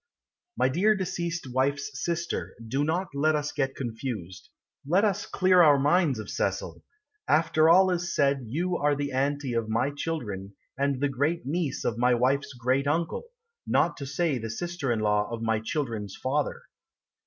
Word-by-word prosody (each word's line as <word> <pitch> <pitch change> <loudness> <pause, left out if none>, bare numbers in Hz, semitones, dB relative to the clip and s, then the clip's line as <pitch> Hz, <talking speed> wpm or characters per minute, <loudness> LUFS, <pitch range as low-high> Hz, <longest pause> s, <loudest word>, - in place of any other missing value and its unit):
My - - +3
dear 195 +11 +3
deceased 170 -3 -3
wife's 140 +2 0
sister, 170 0 -2
Do 135 +5 0
not 170 +4 -1
let 155 +2 +2
us 150 0 -1
get 135 -2 -1
confused. 115 -7 -6 0.3
Let 180 +9 +3
us 200 -1 -1
clear 185 -1 +4
our 150 -4 +7
minds 145 -1 +3
of 110 -2 -6
Cecil. - - -2 0.5
After 155 0 +4
all 185 +2 +6
is 175 0 -2
said 140 -3 +2
You 175 +9 -1
are 145 0 +2
the 140 0 -3
Auntie 140 0 -1
of 115 -1 -1
my 115 +6 +1
children, 105 -12 -4 0.2
And 140 -1 0
the 145 - +3
great 145 +6 -1
niece 155 +1 -2
of 115 0 -1
my 125 0 +4
wife's 140 +3 +1
great 130 +3 0
uncle, 165 - -1 0.4
Not - - +2
to 140 - -6
say 140 -1 0
the 115 0 -5
sister 170 +1 -3
in 110 -2 0
law 105 -1 +1
of 115 -1 -5
my 110 -1 +1
children's 110 -5 -3
father. 140 +3 -2
140 Hz, 170 wpm, -27 LUFS, 125-165 Hz, 0.5 s, our